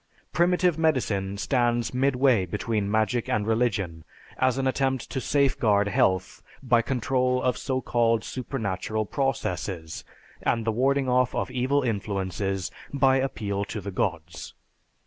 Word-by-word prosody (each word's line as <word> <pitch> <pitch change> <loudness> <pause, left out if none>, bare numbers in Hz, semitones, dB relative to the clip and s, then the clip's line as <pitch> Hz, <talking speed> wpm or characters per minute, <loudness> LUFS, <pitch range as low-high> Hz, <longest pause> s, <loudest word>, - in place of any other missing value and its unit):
Primitive 175 -1 +2
medicine 105 -11 0
stands 120 0 0
midway 130 -6 +2
between 105 +2 -2
magic 110 +2 0
and 105 -1 0
religion, 105 -8 0 0.4
as 130 -1 +2
an 135 - -1
attempt 130 0 0
to 130 - -2
safeguard 125 -8 +2
health 95 -5 +1 0.2
by 120 -2 +4
control 125 +1 0
of 125 - +2
so 130 -1 -2
called 115 -2 +1
supernatural 110 -4 -3
processes, 90 - -3 0.4
and 115 -1 0
the 115 - +2
warding 135 +4 +1
off 125 0 +2
of - - -2
evil 130 +3 +1
influences 95 -3 -2 0.2
by 135 -1 +3
appeal 105 -7 -2
to 105 - -5
the 100 0 -6
gods. 85 -3 -3
120 Hz, 130 wpm, -26 LUFS, 100-130 Hz, 0.4 s, by